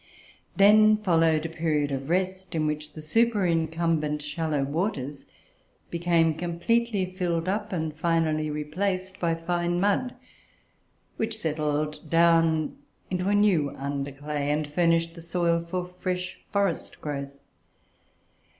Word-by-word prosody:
Then 215 Hz, +2 st, +6 dB
followed 165 Hz, -6 st, +2 dB
a -, -, -2 dB
period 155 Hz, -3 st, 0 dB
of 135 Hz, +1 st, -4 dB
rest, 185 Hz, +1 st, -1 dB
in 155 Hz, -1 st, +1 dB
which 150 Hz, 0 st, -3 dB
the 155 Hz, -, -9 dB
superincumbent 165 Hz, -6 st, +1 dB
shallow 150 Hz, -1 st, -1 dB
waters 145 Hz, -2 st, -3 dB, 0.7 s
became 170 Hz, -1 st, +2 dB
completely 185 Hz, +6 st, 0 dB
filled 180 Hz, -2 st, -2 dB
up, 205 Hz, +2 st, -1 dB
and 160 Hz, -4 st, -2 dB
finally 160 Hz, -2 st, +1 dB
replaced, 185 Hz, +5 st, -2 dB
by 165 Hz, -1 st, +1 dB
fine 175 Hz, +1 st, -1 dB
mud, 205 Hz, +6 st, +1 dB, 1.0 s
which 220 Hz, 0 st, -2 dB
settled 150 Hz, -3 st, -2 dB
down 165 Hz, -1 st, +3 dB, 0.3 s
into 180 Hz, +1 st, 0 dB
a 205 Hz, -, +3 dB
new 190 Hz, -9 st, +3 dB
under 140 Hz, 0 st, -3 dB
clay, 145 Hz, +1 st, -3 dB
and 150 Hz, +1 st, +1 dB
furnished 165 Hz, +2 st, +1 dB
the 170 Hz, -, -11 dB
soil 170 Hz, 0 st, 0 dB
for 180 Hz, 0 st, -2 dB
a 180 Hz, 0 st, -19 dB
fresh 180 Hz, 0 st, -3 dB
forest 200 Hz, -4 st, -1 dB
growth. 140 Hz, -2 st, -5 dB
165 Hz, 125 wpm, -26 LUFS, 150-185 Hz, 1.0 s, Then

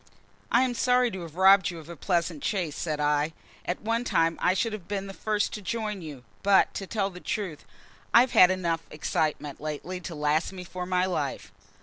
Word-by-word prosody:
"I 240 Hz, +2 st, +5 dB
am 255 Hz, -1 st, 0 dB
sorry 250 Hz, 0 st, +2 dB
to 190 Hz, -, -6 dB
have 165 Hz, -2 st, -9 dB
robbed 190 Hz, +1 st, +6 dB
you 175 Hz, -, -7 dB
of 160 Hz, -2 st, -11 dB
a 170 Hz, -, -8 dB
pleasant 170 Hz, -2 st, -1 dB
chase," 175 Hz, -8 st, -1 dB
said 155 Hz, -3 st, -3 dB
I. 150 Hz, +1 st, +1 dB, 0.3 s
"At 180 Hz, -, -2 dB
one 230 Hz, +2 st, 0 dB
time 165 Hz, -8 st, +2 dB
I 180 Hz, -, +3 dB
should 225 Hz, +3 st, 0 dB
have 195 Hz, -5 st, -7 dB
been 200 Hz, -1 st, -3 dB
the 195 Hz, -, -7 dB
first 210 Hz, +1 st, -1 dB
to 210 Hz, -, -5 dB
join 210 Hz, -1 st, -3 dB
you. 145 Hz, -6 st, -9 dB, 0.2 s
But, 200 Hz, -1 st, +4 dB
to 195 Hz, -, -5 dB
tell 200 Hz, -2 st, -1 dB
you -, -, -15 dB
the 180 Hz, -, -9 dB
truth, 195 Hz, -6 st, -4 dB, 0.5 s
I've 240 Hz, +2 st, +6 dB
had 180 Hz, -, +7 dB
enough 170 Hz, -3 st, 0 dB
excitement 150 Hz, -1 st, -2 dB
lately 155 Hz, +4 st, -4 dB
to 170 Hz, -1 st, -7 dB
last 150 Hz, +4 st, 0 dB
me 185 Hz, -1 st, -7 dB
for 180 Hz, 0 st, -6 dB
my 180 Hz, 0 st, +2 dB
life." 155 Hz, -, -3 dB
180 Hz, 215 wpm, -27 LUFS, 160-205 Hz, 0.5 s, had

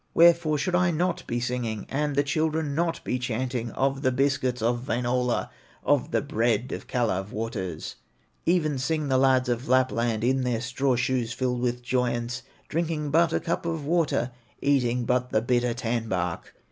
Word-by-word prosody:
Wherefore 170 Hz, -2 st, +5 dB
should 180 Hz, +5 st, -1 dB
I 180 Hz, 0 st, +3 dB
not 175 Hz, +2 st, -1 dB
be 120 Hz, -, -1 dB
singing, 120 Hz, -3 st, -2 dB
And 145 Hz, +1 st, -1 dB
the 140 Hz, -, +3 dB
children 155 Hz, +1 st, 0 dB
not 165 Hz, +2 st, -1 dB
be 125 Hz, -, -1 dB
chanting 125 Hz, 0 st, -2 dB
Of 135 Hz, 0 st, 0 dB
the 130 Hz, -2 st, +2 dB
biscuits 130 Hz, -1 st, +1 dB
of 120 Hz, +3 st, 0 dB
Wainola, 125 Hz, 0 st, 0 dB, 0.3 s
Of -, -, +2 dB
the -, -, 0 dB
bread 115 Hz, +1 st, 0 dB
of -, -, -6 dB
Kalew 105 Hz, -6 st, 0 dB
waters? 105 Hz, -7 st, -4 dB, 0.5 s
Even 155 Hz, -5 st, +2 dB
sing 150 Hz, +2 st, -1 dB
the 130 Hz, -1 st, +3 dB
lads 130 Hz, -1 st, +4 dB
of 120 Hz, 0 st, -1 dB
Lapland 120 Hz, -3 st, +2 dB
In 130 Hz, +2 st, +2 dB
their 125 Hz, -3 st, 0 dB
straw 130 Hz, +1 st, 0 dB
shoes 120 Hz, -1 st, 0 dB
filled 125 Hz, 0 st, -1 dB
with 125 Hz, 0 st, -1 dB
joyance, 120 Hz, 0 st, -1 dB, 0.3 s
Drinking 155 Hz, -2 st, -1 dB
but 165 Hz, +2 st, +4 dB
a -, -, +1 dB
cup 170 Hz, -, -2 dB
of 160 Hz, -3 st, -3 dB
water, 150 Hz, -7 st, +1 dB, 0.3 s
Eating 125 Hz, -4 st, +1 dB
but 125 Hz, +1 st, +1 dB
the 110 Hz, -, +2 dB
bitter 120 Hz, 0 st, +1 dB
tan 115 Hz, -1 st, -2 dB
bark. 90 Hz, -3 st, -3 dB
125 Hz, 170 wpm, -26 LUFS, 120-145 Hz, 0.5 s, Wherefore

